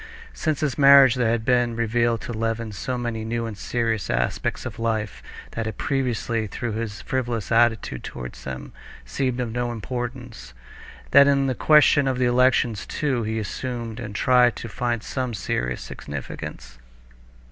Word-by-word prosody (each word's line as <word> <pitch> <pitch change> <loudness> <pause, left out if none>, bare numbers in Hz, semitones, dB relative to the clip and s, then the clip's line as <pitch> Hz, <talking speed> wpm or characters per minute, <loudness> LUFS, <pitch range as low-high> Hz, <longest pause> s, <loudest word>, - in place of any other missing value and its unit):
Since 155 -4 -1
his 150 -2 -1
marriage 140 -3 +8
there 125 -3 +1
had 115 -1 0
been 120 -2 +2
revealed 115 0 +1
to 120 - -5
Levin 115 0 -2
so 125 +5 -3
many 120 -2 -3
new 115 +1 -2
and 110 -2 -5
serious 115 0 -2
aspects - - -1
of - - -6
life 110 -3 -2 0.3
that 115 -1 -3
had 110 - -5
previously, 120 -4 -1
through 120 +4 -4
his 110 -2 -4
frivolous 120 -5 -2
attitude 115 -1 +2
to 60 -1 -6 0.2
them, 65 -1 -7 0.3
seemed 130 - -2
of 120 -3 -2
no 120 +1 -2
importance, 120 - -6 0.6
that 140 0 +8
in 140 -1 +3
the 130 - +1
question 145 0 +5
of 130 -1 0
the 125 - +2
elections 120 -3 +2
too 135 -5 -1
he 110 0 -2
assumed 115 +2 -4
and 105 -4 -7
tried 125 0 +4
to - - -6
find 120 +1 -2
some 130 -3 -3
serious 60 -9 -2
significance. 65 -3 -8
120 Hz, 160 wpm, -24 LUFS, 110-125 Hz, 0.6 s, marriage